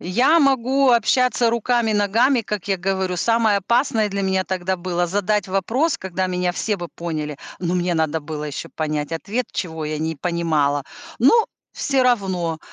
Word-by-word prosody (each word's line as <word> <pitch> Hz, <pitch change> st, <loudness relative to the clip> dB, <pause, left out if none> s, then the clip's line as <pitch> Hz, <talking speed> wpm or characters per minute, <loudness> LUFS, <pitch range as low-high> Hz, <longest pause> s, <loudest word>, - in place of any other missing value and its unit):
Я 250 Hz, -, +3 dB
могу 270 Hz, -1 st, +3 dB
общаться 245 Hz, +1 st, +3 dB
руками, 235 Hz, 0 st, +1 dB
ногами, 225 Hz, +5 st, +2 dB
как 210 Hz, -3 st, -5 dB
я 195 Hz, -, +2 dB
говорю. 190 Hz, 0 st, -1 dB
Самое 225 Hz, +1 st, +2 dB
опасное 225 Hz, +1 st, +1 dB
для 200 Hz, -, -2 dB
меня 190 Hz, 0 st, +1 dB
тогда 185 Hz, 0 st, -2 dB
было 175 Hz, 0 st, -1 dB
задать 205 Hz, +2 st, 0 dB
вопрос, 225 Hz, -, 0 dB
когда 185 Hz, 0 st, -3 dB
меня 180 Hz, -1 st, -1 dB
все 210 Hz, +3 st, -1 dB
бы 175 Hz, -2 st, -6 dB
поняли, 155 Hz, -4 st, -5 dB, 0.2 s
но 175 Hz, 0 st, -1 dB
мне 175 Hz, -1 st, 0 dB
надо 160 Hz, -1 st, 0 dB
было 150 Hz, 0 st, -6 dB
еще 150 Hz, +2 st, -6 dB
понять 150 Hz, -2 st, -3 dB
ответ, 205 Hz, +9 st, -3 dB
чего 160 Hz, -4 st, -4 dB
я 155 Hz, -, -3 dB
не 160 Hz, +1 st, -2 dB
понимала. 155 Hz, -4 st, 0 dB, 0.4 s
Но 435 Hz, -, +5 dB, 0.3 s
всё 275 Hz, -3 st, 0 dB
равно, 190 Hz, -9 st, 0 dB
190 Hz, 165 wpm, -21 LUFS, 170-230 Hz, 0.4 s, Но